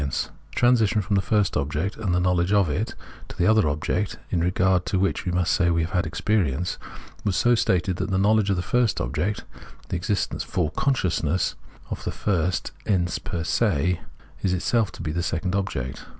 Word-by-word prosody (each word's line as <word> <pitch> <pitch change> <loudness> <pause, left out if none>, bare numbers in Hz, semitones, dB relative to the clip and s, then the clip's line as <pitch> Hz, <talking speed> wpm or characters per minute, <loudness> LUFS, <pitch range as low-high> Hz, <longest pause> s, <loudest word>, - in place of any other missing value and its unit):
The 70 -2 -1 0.3
transition 115 -4 +3
from 100 +1 0
the 95 - +3
first 105 +1 +1
object 75 +7 -1
and 105 -5 -2
the 90 - +2
knowledge 90 0 +2
of 100 -6 +3
it 100 +10 -2 0.3
to - - -10
the 90 - +2
other 110 -4 +4
object, 75 +1 -1
in 85 - +1
regard 90 +1 +2
to 95 - 0
which 95 0 0
we 90 0 +1
say 90 0 +2
we 85 -1 +2
have 80 - -4
had 90 -3 0
experience, 85 -3 0 0.4
was 100 -3 0
so 120 +5 +4
stated 95 -5 +1
tbat 95 +2 -2
the 95 - +1
knowledge 105 +1 +3
of 100 - +3
the 90 - -2
first 120 -1 +1
object, 75 +12 -1 0.5
the - - -2
existence 100 +4 -1
for 80 -3 -1
consciousness 90 - 0 0.4
of - - -4
the - - -2
first 90 -3 -1 0.2
ens 90 -4 +1
per 85 -2 -4
se, 90 -3 +1 0.4
is 95 - +1
itself 110 +4 +1
to - - -8
be 80 - -2
the 85 +2 -1
second 85 +2 -1
object. 65 -11 -3
90 Hz, 195 wpm, -24 LUFS, 85-100 Hz, 0.5 s, other